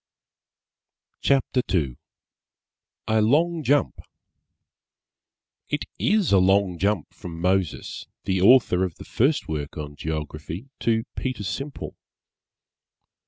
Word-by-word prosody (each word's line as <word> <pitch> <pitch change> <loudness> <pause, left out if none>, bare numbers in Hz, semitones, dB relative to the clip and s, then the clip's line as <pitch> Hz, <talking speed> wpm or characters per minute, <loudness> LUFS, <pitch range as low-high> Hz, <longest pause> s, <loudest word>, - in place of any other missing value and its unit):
CHAPTER 135 -2 +2
II 75 -9 +1 1.1
A 110 0 +3
LONG 160 +9 +3
JUMP 145 -1 +1 1.7
It - - -2
is 205 -5 +2
a 100 - +6
long 95 -1 +3
jump 100 -4 0
from 85 -2 -8
Moses, 90 -1 -1 0.2
the 95 -1 0
author 105 -4 +6
of 90 -3 -2
the - - -11
first 140 +6 +1
work 75 -2 -4
on 75 -1 -6
Geography, 80 - -5
to 115 -1 +1
Peter 130 -5 -3
Simple. 140 +8 -5
100 Hz, 105 wpm, -24 LUFS, 85-130 Hz, 1.7 s, a